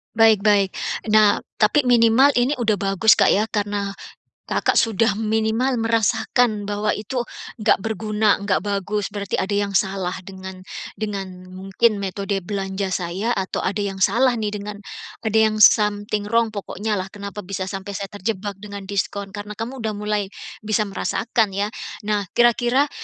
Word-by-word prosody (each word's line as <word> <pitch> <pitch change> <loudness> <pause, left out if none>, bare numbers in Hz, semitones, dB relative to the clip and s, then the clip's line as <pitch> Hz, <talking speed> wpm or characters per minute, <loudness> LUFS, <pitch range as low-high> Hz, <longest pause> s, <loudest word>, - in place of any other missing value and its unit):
Baik 225 -2 +6
baik. 200 -2 +4 0.4
Nah, 215 -1 +5 0.2
tapi 230 +7 +4
minimal 245 +2 +5
ini 255 +4 +2
udah 225 -5 +1
bagus, 195 +2 +3
Kak, - - +5
ya, 205 - +3
karena, 205 -1 -1 0.5
Kakak - - 0
sudah 225 -2 +2
minimal 220 +4 0
merasakan 225 -1 +1
bahwa 205 +1 -1
itu 240 +4 -3 0.4
nggak - - +4
berguna, 215 0 +1
nggak 200 -1 +1
bagus, 205 0 -2
berarti 200 -2 -4
ada 200 +2 -1
yang 200 0 0
salah 190 -2 0
dengan 190 -1 -9 0.4
dengan 195 -4 -5
mungkin 195 +4 0
metode 195 0 -2
belanja 195 0 -3
saya 185 +5 -2
atau 190 -4 -2
ada 200 +2 -1
yang 195 -2 -2
salah 250 +3 +4
nih 215 -2 -2
dengan 205 0 -5 0.5
ada 220 -1 +1
yang 215 -1 +3
something 205 0 +4
wrong 230 +1 +2
pokoknya 210 0 -3
lah, 185 - -3
kenapa 200 +1 -8
bisa 190 0 -4
sampai 195 0 -6
saya 195 0 -5
terjebak 205 -1 -4
dengan 200 0 -8
diskon, 200 0 -3
karena 205 +1 -7
kamu 230 +5 -6
udah 220 -3 -3
mulai 210 -1 -1 0.3
bisa 215 0 0
merasakan, 210 +1 -1
ya. 205 +2 -1 0.3
Nah, 205 -1 -1
kira-kira 240 +4 +3
205 Hz, 155 wpm, -22 LUFS, 195-220 Hz, 0.5 s, Baik